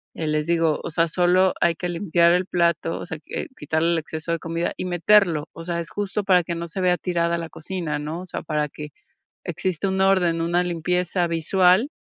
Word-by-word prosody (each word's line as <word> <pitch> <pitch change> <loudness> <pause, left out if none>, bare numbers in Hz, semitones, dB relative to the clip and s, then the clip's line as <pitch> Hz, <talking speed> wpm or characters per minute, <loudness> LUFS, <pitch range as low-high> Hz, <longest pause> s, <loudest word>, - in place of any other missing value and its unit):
eh, 160 - -3
les 150 0 0
digo, 165 -2 +2
o - - -4
sea, 165 +1 +2
solo 180 +2 +3
hay 170 -1 +4
que 180 +2 -4
limpiar 170 -1 +3
el 180 +1 +1
plato, 170 -2 0
o - - -6
sea, 160 -3 -5 0.4
quitarle 160 +3 0
el - - +1
exceso 160 +1 -5
de 165 - -2
comida 165 +2 -2
y - - -4
meterlo, 175 -3 +3
o 165 - -9
sea, 170 -1 -2
es 170 - -5
justo 205 0 -3
para 180 -3 +4
que 170 - -4
no 170 0 -5
se 185 +3 -5
vea 180 -1 +3
tirada 170 -2 0
la 165 -1 -6
cocina, 175 -2 -4
¿no?, 155 +4 -5
o - - -8
sea, - - -4
para 150 -1 -1
que 150 +1 -9 0.6
exista 185 +1 -2
un 190 0 -1
orden, 185 -4 +3
una 175 +1 +1
limpieza 180 +1 0
visual, 180 - +3
170 Hz, 215 wpm, -23 LUFS, 165-180 Hz, 0.6 s, hay